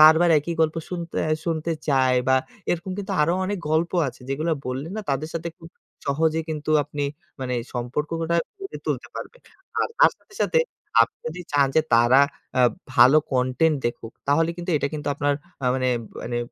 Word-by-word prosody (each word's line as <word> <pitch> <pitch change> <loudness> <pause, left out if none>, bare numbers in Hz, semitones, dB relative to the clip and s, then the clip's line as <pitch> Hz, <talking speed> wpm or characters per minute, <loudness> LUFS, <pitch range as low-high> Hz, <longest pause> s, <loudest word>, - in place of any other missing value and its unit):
বারবার 160 +3 +8
একই 165 +3 -3
গল্প 160 0 +2
শুনতে 170 -2 -5
অ্যাঁ 155 0 +1
শুনতে 165 -1 -1 0.2
চায় 130 -2 +4
বা 130 - +5 0.3
এরকম 175 +2 -2
কিন্তু 195 - -3
আরো 165 +3 +2
অনেক 200 +1 -2
গল্প 160 +2 +2 0.2
আছে 130 - -11
যেগুলা 155 +5 0
বললে 130 +3 -3
না - - -2
তাদের 140 +3 -1
সাথে 165 +1 -2
খুব 165 - -12 0.4
সহজেই 160 +3 +1
কিন্তু 155 0 -3
আপনি 145 0 -4 0.4
মানে 125 -1 -2 0.2
সম্পর্কটা 155 +7 -1 0.2
গড়ে 390 +2 -6
তুলতে - - -2
পারবেন। - - -8 0.4
আর - - +1
তার - - +7
সাথে, 400 - -22
সাথে 485 - +3 0.4
আপনি 115 - -2
যদি 165 +3 -5
চান 140 -1 +5
যে 160 - +6
তারা 120 +4 +6 0.4
আ - - +5 0.3
ভালো 130 +3 +7 0.2
কনটেন্ট 130 +5 +2
দেখুক, 115 -1 -5 0.2
তাহলে 165 +4 +3
কিন্তু 175 +1 -4
এটা 140 - 0
কিন্তু 150 -1 -3
আপনার 145 0 +1 0.3
আ - - +2
মানে 130 -1 +1 0.3
মানে 120 0 -2
155 Hz, 180 wpm, -24 LUFS, 135-165 Hz, 0.4 s, বারবার